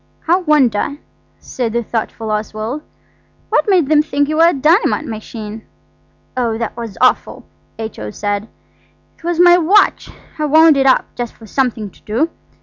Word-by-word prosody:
"I 345 Hz, +2 st, +4 dB
wonder," 290 Hz, -, +1 dB, 0.4 s
said 235 Hz, -4 st, -4 dB
the 235 Hz, 0 st, 0 dB
thoughtful 225 Hz, 0 st, -4 dB
Oswald, 215 Hz, +5 st, -3 dB, 0.7 s
"what -, -, +1 dB
made 360 Hz, -7 st, +3 dB
them 300 Hz, 0 st, +4 dB
think 290 Hz, -2 st, -1 dB
you 310 Hz, -, -1 dB
were 330 Hz, +1 st, +6 dB
a -, -, +4 dB
dynamite 310 Hz, -, +2 dB
machine?" 220 Hz, -2 st, -7 dB, 0.7 s
"Oh, 235 Hz, -3 st, -1 dB
that 230 Hz, -1 st, -4 dB
was 230 Hz, -4 st, -7 dB
awful!" -, -, +1 dB, 0.3 s
H.O. 220 Hz, -, -6 dB
said. 205 Hz, -, -3 dB, 0.7 s
"It -, -, -24 dB
was 345 Hz, 0 st, -2 dB
my 350 Hz, 0 st, +7 dB
watch. 380 Hz, +5 st, +3 dB, 0.3 s
I 305 Hz, -, 0 dB
wound 315 Hz, +1 st, +6 dB
it 270 Hz, 0 st, +2 dB
up, 260 Hz, -, +4 dB
just 240 Hz, -2 st, -5 dB
for 225 Hz, -, -15 dB
something 225 Hz, -3 st, -2 dB
to -, -, -23 dB
do. 260 Hz, +10 st, -1 dB
255 Hz, 160 wpm, -17 LUFS, 220-315 Hz, 0.7 s, my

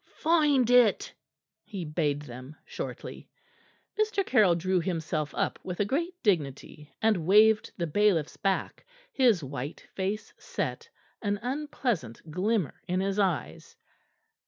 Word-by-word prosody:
"Find 300 Hz, -6 st, +3 dB
it," 245 Hz, -4 st, +4 dB, 0.5 s
he 195 Hz, -6 st, -6 dB
bade 150 Hz, -2 st, -1 dB
them 130 Hz, +2 st, -10 dB
shortly. -, -, -7 dB, 0.7 s
Mr. 430 Hz, -2 st, +1 dB
Caryll 210 Hz, -, +4 dB
drew 185 Hz, +2 st, +1 dB
himself 160 Hz, -3 st, -2 dB
up -, -, -1 dB
with 180 Hz, -1 st, -6 dB
a 205 Hz, -, +2 dB
great 335 Hz, -, -1 dB
dignity, 150 Hz, -, -1 dB
and 205 Hz, -8 st, +2 dB
waved 215 Hz, +2 st, +5 dB
the 170 Hz, -, -1 dB
bailiffs 170 Hz, -2 st, +2 dB
back, 195 Hz, -2 st, -2 dB, 0.3 s
his 235 Hz, -, +3 dB
white 140 Hz, +2 st, -6 dB
face 200 Hz, +3 st, -3 dB
set, -, -, -4 dB, 0.3 s
an 205 Hz, -1 st, 0 dB
unpleasant 245 Hz, -, -3 dB
glimmer 190 Hz, 0 st, -1 dB
in 180 Hz, +1 st, 0 dB
his 195 Hz, +1 st, -1 dB
eyes. 185 Hz, -6 st, -1 dB
190 Hz, 125 wpm, -28 LUFS, 155-225 Hz, 0.7 s, waved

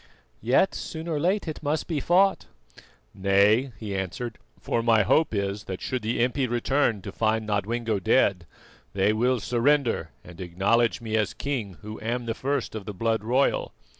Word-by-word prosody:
"Yet, 125 Hz, -, +3 dB
soon 160 Hz, +1 st, -6 dB
or 160 Hz, -3 st, -1 dB
late, 185 Hz, +5 st, 0 dB
it 155 Hz, -, -5 dB
must 150 Hz, +1 st, -1 dB
be 160 Hz, -4 st, -1 dB
fought." 190 Hz, +6 st, +3 dB, 0.7 s
"Nay," 100 Hz, +6 st, +3 dB
he 100 Hz, -1 st, -5 dB
answered, 110 Hz, +5 st, -4 dB, 0.2 s
"for 115 Hz, -, -1 dB
my 115 Hz, -2 st, +4 dB
hope 155 Hz, +10 st, +3 dB
is 100 Hz, 0 st, -2 dB
that 95 Hz, -1 st, -5 dB
should 130 Hz, -1 st, -3 dB
the 115 Hz, +2 st, 0 dB
impi 130 Hz, +2 st, 0 dB
return 120 Hz, -3 st, 0 dB
to 100 Hz, -, -6 dB
find 110 Hz, +1 st, 0 dB
Nodwengo 110 Hz, +1 st, -1 dB
dead, 100 Hz, -5 st, +2 dB, 0.5 s
they 100 Hz, +2 st, +3 dB
will 125 Hz, +3 st, +1 dB
surrender 120 Hz, -, +1 dB
and 90 Hz, +1 st, -11 dB
acknowledge 100 Hz, +8 st, +1 dB
me 110 Hz, -1 st, -3 dB
as 105 Hz, -2 st, -1 dB
king, 120 Hz, -10 st, -4 dB
who 105 Hz, +1 st, -8 dB
am 120 Hz, +2 st, -2 dB
the 115 Hz, -, -1 dB
first 135 Hz, +2 st, -2 dB
of 110 Hz, -3 st, -6 dB
the 105 Hz, -, -6 dB
blood 110 Hz, +2 st, 0 dB
royal. 125 Hz, +5 st, +1 dB
115 Hz, 170 wpm, -26 LUFS, 100-130 Hz, 0.7 s, my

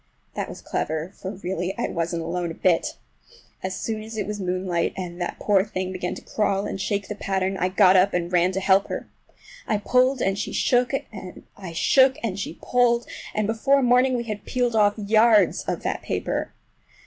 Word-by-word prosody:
That -, -, -4 dB
was -, -, -10 dB
clever, 160 Hz, +4 st, -3 dB
for 190 Hz, -, -6 dB
really 185 Hz, -1 st, -4 dB
I -, -, -1 dB
wasn't 165 Hz, 0 st, -2 dB
alone 175 Hz, +1 st, -2 dB
a 165 Hz, -, -6 dB
bit! 175 Hz, -3 st, +1 dB, 0.6 s
As 185 Hz, 0 st, -3 dB
soon 220 Hz, -1 st, -3 dB
as 220 Hz, +1 st, -8 dB
it 210 Hz, -, -1 dB
was 210 Hz, 0 st, -4 dB
moonlight, 180 Hz, -2 st, -1 dB
and 175 Hz, -1 st, -6 dB
that 175 Hz, -, -3 dB
poor 200 Hz, -2 st, +3 dB
thing 185 Hz, -3 st, -4 dB
began 180 Hz, -1 st, -3 dB
to -, -, -10 dB
crawl 200 Hz, -2 st, 0 dB
and 195 Hz, -, -4 dB
shake 200 Hz, 0 st, -1 dB
the -, -, -4 dB
pattern, 195 Hz, -1 st, -1 dB
I 185 Hz, -1 st, 0 dB
got 190 Hz, 0 st, +5 dB
up 190 Hz, +2 st, +5 dB
and 175 Hz, 0 st, -2 dB
ran 180 Hz, +1 st, +3 dB
to 190 Hz, -, -1 dB
help 195 Hz, 0 st, +3 dB
her. -, -, -5 dB, 0.6 s
I 215 Hz, -, +1 dB
pulled 255 Hz, +5 st, +2 dB
and 195 Hz, -2 st, 0 dB
she -, -, -3 dB
shook, 245 Hz, +1 st, +2 dB, 0.6 s
I 185 Hz, -4 st, -8 dB
shook 265 Hz, +9 st, +4 dB
and 200 Hz, -4 st, -2 dB
she 175 Hz, -4 st, -5 dB
pulled, 240 Hz, -1 st, +2 dB, 0.3 s
and 215 Hz, -, +1 dB
before 260 Hz, +6 st, +2 dB
morning 250 Hz, +1 st, +4 dB
we 235 Hz, -, -2 dB
had 215 Hz, -3 st, -5 dB
peeled 245 Hz, -2 st, -1 dB
off 205 Hz, -1 st, +4 dB
yards 215 Hz, -1 st, +4 dB
of -, -, -3 dB
that -, -, -2 dB
paper. -, -, -2 dB
195 Hz, 195 wpm, -24 LUFS, 185-220 Hz, 0.6 s, got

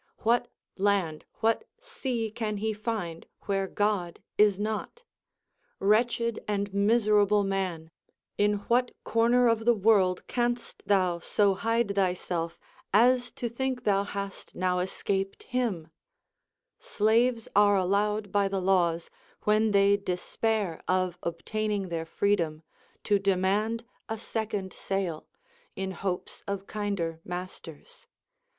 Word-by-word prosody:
What 240 Hz, +2 st, +3 dB, 0.3 s
land, 190 Hz, -6 st, +1 dB, 0.2 s
\vhat 225 Hz, +1 st, +3 dB, 0.2 s
sea 255 Hz, -, -3 dB
can 215 Hz, -1 st, -3 dB
he 220 Hz, +2 st, -1 dB
find 210 Hz, -6 st, -4 dB
where 195 Hz, -1 st, -1 dB
God 200 Hz, -4 st, -1 dB, 0.2 s
is 205 Hz, -2 st, +4 dB
not 220 Hz, -, -3 dB, 0.7 s
1 195 Hz, -, -1 dB
Wretched 235 Hz, +1 st, +2 dB
and 200 Hz, -1 st, -1 dB
miser 210 Hz, +1 st, +4 dB
able 205 Hz, 0 st, +3 dB
man! 185 Hz, -5 st, -2 dB, 0.4 s
in 205 Hz, 0 st, +3 dB
what 245 Hz, +1 st, +2 dB
corner 235 Hz, +2 st, +3 dB
of 230 Hz, -1 st, +2 dB
the 240 Hz, 0 st, +5 dB
Avorld 195 Hz, -3 st, +3 dB
canst 240 Hz, -1 st, -2 dB
thou 185 Hz, -4 st, +2 dB
so 200 Hz, +3 st, +2 dB
hide 225 Hz, +1 st, 0 dB
thyself, 180 Hz, -3 st, -1 dB, 0.3 s
as 245 Hz, +4 st, +4 dB
to 240 Hz, -, -3 dB
think 255 Hz, +2 st, -2 dB
thou 200 Hz, -1 st, +2 dB
hast 200 Hz, -1 st, -6 dB
now 180 Hz, 0 st, +1 dB
escaped 195 Hz, +1 st, -2 dB
hiin 250 Hz, -2 st, +2 dB
1 160 Hz, -, -24 dB, 0.9 s
Slaves 230 Hz, +2 st, +2 dB
are 205 Hz, 0 st, +6 dB
allowed 205 Hz, +2 st, +1 dB
by 200 Hz, 0 st, +3 dB
the 195 Hz, 0 st, -1 dB
laAvs, 175 Hz, -3 st, +2 dB, 0.4 s
when 215 Hz, +1 st, +3 dB
they 200 Hz, 0 st, +4 dB
despair 200 Hz, 0 st, -2 dB
of 185 Hz, -1 st, 0 dB
obtaining 200 Hz, +3 st, -2 dB
their 165 Hz, -1 st, -3 dB
freedom, 165 Hz, -5 st, 0 dB, 0.4 s
to 205 Hz, -1 st, +3 dB
demand 200 Hz, +4 st, +1 dB, 0.2 s
a 225 Hz, -, -2 dB
second 210 Hz, -4 st, -3 dB
sale, 190 Hz, -5 st, -3 dB, 0.5 s
in 190 Hz, 0 st, -3 dB
hopes 185 Hz, 0 st, -4 dB
of 200 Hz, -1 st, -3 dB
kinder 200 Hz, -7 st, -3 dB
masters. 180 Hz, -, -8 dB
200 Hz, 125 wpm, -28 LUFS, 185-220 Hz, 0.9 s, are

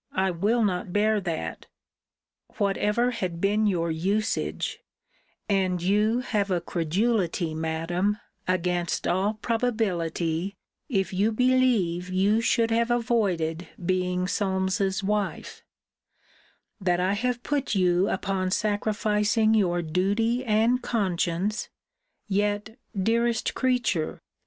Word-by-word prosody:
I 190 Hz, 0 st, +2 dB
will 210 Hz, +7 st, +1 dB
not 180 Hz, -3 st, -1 dB
bear 210 Hz, +2 st, +2 dB
that 165 Hz, -4 st, -4 dB, 0.9 s
'Whatever 210 Hz, +4 st, +1 dB
had 185 Hz, -8 st, -3 dB
been 210 Hz, +3 st, +2 dB
your 170 Hz, -4 st, 0 dB
usage: 200 Hz, +8 st, -1 dB, 0.7 s
and 190 Hz, -3 st, +1 dB
you 210 Hz, +6 st, +2 dB
have 210 Hz, -5 st, -1 dB
a 180 Hz, -2 st, +1 dB
credulity, 175 Hz, 0 st, 0 dB
Madam, 165 Hz, +5 st, -1 dB, 0.3 s
against 180 Hz, -1 st, 0 dB
all 195 Hz, +4 st, +1 dB
probability, 195 Hz, -6 st, -1 dB, 0.3 s
if 195 Hz, -6 st, 0 dB
you 205 Hz, +4 st, +2 dB
believe 225 Hz, -8 st, +2 dB
you 200 Hz, +4 st, +2 dB
should 230 Hz, 0 st, +2 dB
have 230 Hz, +1 st, +2 dB
avoided 195 Hz, -9 st, 0 dB, 0.2 s
being 180 Hz, 0 st, 0 dB
Solmes's 190 Hz, 0 st, 0 dB
wife: 205 Hz, 0 st, -2 dB, 1.2 s
That 180 Hz, -3 st, +1 dB
I 185 Hz, +2 st, +1 dB
have 245 Hz, +3 st, -1 dB
put 280 Hz, -6 st, -1 dB
you 185 Hz, 0 st, +3 dB
upon 190 Hz, -1 st, -1 dB
sacrificing 210 Hz, +1 st, +1 dB
your 175 Hz, -5 st, +2 dB
duty 205 Hz, +9 st, 0 dB
and 230 Hz, +2 st, +2 dB
conscience 200 Hz, -2 st, -1 dB, 0.6 s
yet, 205 Hz, +2 st, -1 dB, 0.2 s
dearest 230 Hz, +3 st, +1 dB
creature! 245 Hz, -11 st, 0 dB
200 Hz, 105 wpm, -26 LUFS, 180-220 Hz, 1.2 s, you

